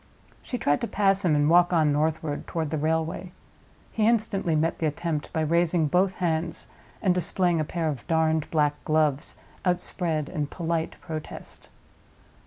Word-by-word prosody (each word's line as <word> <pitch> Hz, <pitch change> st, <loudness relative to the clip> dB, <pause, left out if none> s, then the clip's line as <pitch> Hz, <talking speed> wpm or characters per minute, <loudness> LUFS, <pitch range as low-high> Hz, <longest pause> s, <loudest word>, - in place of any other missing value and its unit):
She 250 Hz, -, -4 dB
tried 145 Hz, -9 st, +1 dB
to 235 Hz, -, -1 dB
pass 195 Hz, -2 st, +2 dB
him 165 Hz, -4 st, +3 dB
and 145 Hz, 0 st, +3 dB
walk 175 Hz, +2 st, +5 dB
on 155 Hz, -4 st, +3 dB
northward 155 Hz, 0 st, -1 dB
toward 160 Hz, -3 st, -3 dB
the 160 Hz, -, 0 dB
railway. 160 Hz, +3 st, -1 dB, 0.6 s
He 215 Hz, -1 st, +1 dB
instantly 205 Hz, -7 st, +1 dB
met 160 Hz, +2 st, 0 dB
the 160 Hz, -, +1 dB
attempt 155 Hz, 0 st, -3 dB
by 160 Hz, -, -1 dB
raising 170 Hz, +1 st, +2 dB
both 185 Hz, +5 st, +2 dB
hands, 165 Hz, -2 st, -1 dB, 0.4 s
and 185 Hz, -, +4 dB
displaying 180 Hz, -1 st, +1 dB
a -, -, +1 dB
pair 165 Hz, +1 st, -2 dB
of 145 Hz, -5 st, -4 dB
darned 160 Hz, -1 st, +1 dB
black 150 Hz, -2 st, +1 dB
gloves 155 Hz, -2 st, +1 dB, 0.3 s
outspread 175 Hz, -4 st, -1 dB
in 150 Hz, -5 st, -3 dB
polite 165 Hz, 0 st, -2 dB
protest. 155 Hz, -2 st, -7 dB
160 Hz, 160 wpm, -26 LUFS, 155-180 Hz, 0.6 s, walk